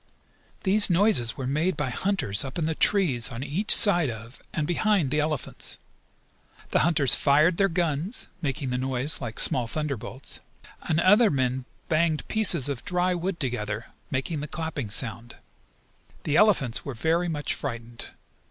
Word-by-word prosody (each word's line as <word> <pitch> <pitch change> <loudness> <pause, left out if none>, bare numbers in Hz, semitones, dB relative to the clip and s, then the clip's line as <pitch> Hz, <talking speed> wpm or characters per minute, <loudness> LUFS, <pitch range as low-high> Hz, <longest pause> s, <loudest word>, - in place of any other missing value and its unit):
These 205 +2 +5
noises 175 - +2
were 130 - -5
made 155 +6 -1
by 135 -4 -2
hunters 125 - +2
up 135 -1 -7
in 165 - -1
the 160 - -1
trees 155 - +2
on 120 +2 -6
each 160 +10 +3
side 175 - +5
of, 115 +2 -10
and 150 - -2
behind, 175 -3 0
the 150 - +1
elephants. 150 -2 -4 0.9
The - - +2
hunters 150 -6 +3
fired 155 +5 +3
their 195 0 +2
guns, 170 - -2
making 135 -3 -3
the 125 - -2
noise 130 +3 -1
like 115 -3 -6
small 125 -3 +4
thunder 150 +1 -3
bolts 130 +5 -7 0.4
and 155 - -1
other 205 +6 +5
black - - -2
men 130 0 -1 0.2
banged 160 -1 0
pieces 185 - +4
of 140 -4 -4
dry 180 -2 0
wood 180 +1 -4
together, 115 -5 -4 0.2
making 140 +4 -3
the 150 - -5
clapping 160 -7 -5
sound. 115 +2 -3 0.9
The 150 - -1
elephants 165 - +2
were 140 - -6
very 165 +8 0
much 150 -2 -2
frightened. 115 0 -6
150 Hz, 160 wpm, -25 LUFS, 125-175 Hz, 0.9 s, These